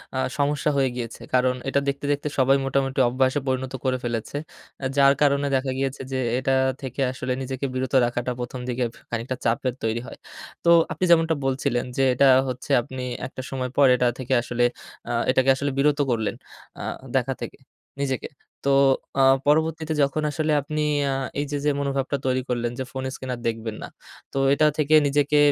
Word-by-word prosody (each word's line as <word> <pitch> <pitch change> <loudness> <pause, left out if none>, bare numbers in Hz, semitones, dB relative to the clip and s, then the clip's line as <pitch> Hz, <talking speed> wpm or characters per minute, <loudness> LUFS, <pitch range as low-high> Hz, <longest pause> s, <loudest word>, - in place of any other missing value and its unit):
আ - - -1 0.2
সমস্যা 145 +1 +1
হয়ে 135 -2 +3
গিয়েছে। 120 -2 -6
কারণ 125 0 +3
এটা 140 - +2
দেখতে, 140 +1 -2
দেখতে 145 +1 -1
সবাই 135 +1 +5
মোটামুটি 135 0 0
অভ্যাসে 130 +3 +1
পরিণত 130 0 -1
করে 130 -1 +1
ফেলেছে। 120 +1 -3 0.6
যার 140 0 +6
কারণে 140 -1 +3
দেখা 130 0 0
গিয়েছে 135 0 -2
যে, 130 - -1 0.2
এটা 130 +1 0 0.3
থেকে 130 0 -5
আসলে 130 0 -4
নিজেকে 130 +1 -4
বিরত 130 -1 -3
রাখাটা 120 +1 -2
১ম 125 +1 -5
দিকে 125 0 -1 0.3
খানিকটা 120 +2 -3
চাপের 120 +2 +1
তৈরি 110 +1 0
হয়। - - -10 0.5
তো 170 - +3 0.2
আপনি - - -4
যেমনটা 165 -1 +4
বলছিলেন 130 -2 0
যে, 135 - +3
এটা 140 +3 +4 0.2
হচ্ছে 125 0 -5
আপনি 130 +2 -7 0.3
একটা 130 - -8
সময় 130 -2 -3
পর, 140 - +6
এটা 125 0 +2
থেকে 130 0 -2
আসলে 120 0 -1 0.5
আ - - -1 0.2
এটাকে 130 0 +2
আসলে 140 +1 -2
বিরত 150 +1 +2
করলেন। 110 -3 -1 0.4
আ - - -6 0.3
দেখা 135 0 +1
থেকে - - -6 0.4
নিজেকে। 135 -2 -2 0.4
তো - - +2 0.5
আ - - +6 0.2
পরবর্তীতে 160 +1 +1
যখন 140 +2 0
আসলে 155 0 -1
আপনি 155 +2 -3 0.3
আ - - 0 0.3
এই 145 - 0
যে, 145 - -1
যে - - +4
মনোভাবটা 140 0 -1
তৈরি 130 0 +1
করলেন 120 -1 -1
যে, - - -1
ফোন 130 0 -5
স্ক্রিন 130 - -8
আর - - -11
দেখবেন 115 -1 -3
না। - - -5 0.4
তো - - -5 0.2
এটা 155 +2 +3
থেকে 155 0 +3
নিজেকে 145 +1 +2
130 Hz, 180 wpm, -24 LUFS, 125-140 Hz, 0.6 s, যার